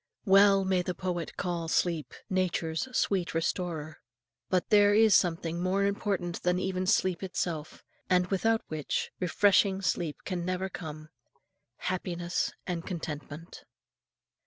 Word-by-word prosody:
Well 195 Hz, 0 st, +6 dB
may 190 Hz, -1 st, +2 dB
the 180 Hz, 0 st, -3 dB
poet 175 Hz, -2 st, -4 dB
call 170 Hz, -3 st, -2 dB
sleep 165 Hz, -1 st, 0 dB
"Nature's 180 Hz, 0 st, -1 dB
sweet 185 Hz, -4 st, 0 dB
restorer." 165 Hz, -2 st, -2 dB, 0.5 s
But 185 Hz, -1 st, 0 dB
there 205 Hz, -1 st, +6 dB
is 220 Hz, -1 st, +6 dB
something 170 Hz, -1 st, +1 dB
more 190 Hz, +2 st, +1 dB
important 195 Hz, -4 st, -2 dB
than 180 Hz, 0 st, +1 dB
even 185 Hz, 0 st, -2 dB
sleep 185 Hz, -1 st, +2 dB
itself, 170 Hz, -5 st, -4 dB, 0.3 s
and 180 Hz, -1 st, +4 dB
without 220 Hz, +4 st, +1 dB
which, 155 Hz, -3 st, -3 dB
refreshing 195 Hz, +2 st, +3 dB
sleep 165 Hz, -3 st, -1 dB
can 180 Hz, -3 st, -3 dB
never 185 Hz, +1 st, -2 dB
come 155 Hz, -3 st, -8 dB, 0.7 s
happiness 175 Hz, -1 st, -2 dB
and 175 Hz, -2 st, -3 dB
contentment. 160 Hz, -2 st, -7 dB
180 Hz, 125 wpm, -29 LUFS, 170-190 Hz, 0.7 s, Well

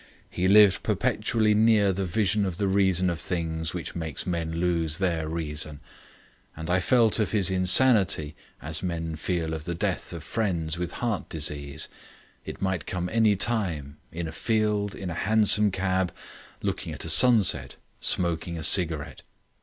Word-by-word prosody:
He 90 Hz, -, -1 dB
lived 100 Hz, -1 st, +6 dB
perpetually 110 Hz, -2 st, 0 dB
near 105 Hz, -2 st, +3 dB
the 95 Hz, 0 st, -3 dB
vision 105 Hz, +1 st, 0 dB
of 95 Hz, -3 st, -3 dB
the 100 Hz, -1 st, -1 dB
reason 95 Hz, -2 st, +2 dB
of 85 Hz, -3 st, -2 dB
things 80 Hz, -2 st, -3 dB
which 90 Hz, -, -6 dB
makes 80 Hz, -5 st, -5 dB
men 85 Hz, -2 st, -3 dB
lose 85 Hz, -2 st, 0 dB
their 85 Hz, -5 st, -1 dB
reason. 75 Hz, -2 st, -2 dB, 0.8 s
And 80 Hz, +2 st, -5 dB
I 95 Hz, -, +3 dB
felt 115 Hz, +2 st, +3 dB
of 110 Hz, -, -1 dB
his 100 Hz, -3 st, +3 dB
insanity 95 Hz, -, +4 dB, 0.3 s
as 80 Hz, +1 st, -1 dB
men 80 Hz, -3 st, -4 dB
feel 80 Hz, 0 st, -3 dB
of 80 Hz, -1 st, -6 dB
the 85 Hz, -, -3 dB
death -, -, -3 dB
of -, -, -7 dB
friends 85 Hz, -8 st, -2 dB
with 90 Hz, -1 st, -4 dB
heart 115 Hz, -5 st, -2 dB
disease. 75 Hz, -1 st, -3 dB, 0.6 s
It -, -, -7 dB
might 95 Hz, -2 st, -2 dB
come 90 Hz, -1 st, -3 dB
anywhere, 100 Hz, -, +1 dB, 0.2 s
in 85 Hz, 0 st, -5 dB
a -, -, -6 dB
field, 105 Hz, +1 st, -1 dB
in 90 Hz, -2 st, -6 dB
a -, -, -4 dB
hansom 105 Hz, +3 st, +3 dB
cab, 95 Hz, -1 st, -1 dB, 0.5 s
looking -, -, -3 dB
at -, -, -6 dB
a -, -, -5 dB
sunset, 115 Hz, -7 st, +4 dB, 0.2 s
smoking 85 Hz, -1 st, -1 dB
a 80 Hz, -, -6 dB
cigarette. 80 Hz, -5 st, +2 dB
90 Hz, 160 wpm, -26 LUFS, 80-100 Hz, 0.8 s, lived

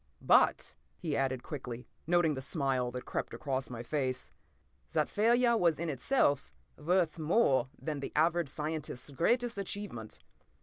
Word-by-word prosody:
p> -, -, -18 dB
"But," -, -, +4 dB, 0.2 s
he 155 Hz, -5 st, -2 dB
added 130 Hz, -2 st, 0 dB
quickly, 125 Hz, -4 st, -6 dB, 0.2 s
noting 175 Hz, -2 st, +3 dB
the 130 Hz, -, -4 dB
smile 135 Hz, -3 st, 0 dB
that 125 Hz, +1 st, -6 dB
crept -, -, -3 dB
across 135 Hz, -3 st, -3 dB
my 120 Hz, -1 st, -6 dB
face, 130 Hz, -1 st, -2 dB, 0.6 s
"that -, -, +2 dB
failure 235 Hz, +3 st, +3 dB
was 170 Hz, -7 st, +3 dB
in 170 Hz, 0 st, -2 dB
itself 140 Hz, -, +1 dB, 0.2 s
worth 170 Hz, 0 st, +1 dB
more 150 Hz, -, +3 dB
than 155 Hz, -3 st, -4 dB
the 140 Hz, -, -5 dB
average 165 Hz, 0 st, +2 dB
scientist's 150 Hz, -3 st, -5 dB
greatest 235 Hz, -, +1 dB
achievement! 195 Hz, -, -6 dB
150 Hz, 145 wpm, -32 LUFS, 130-175 Hz, 0.6 s, But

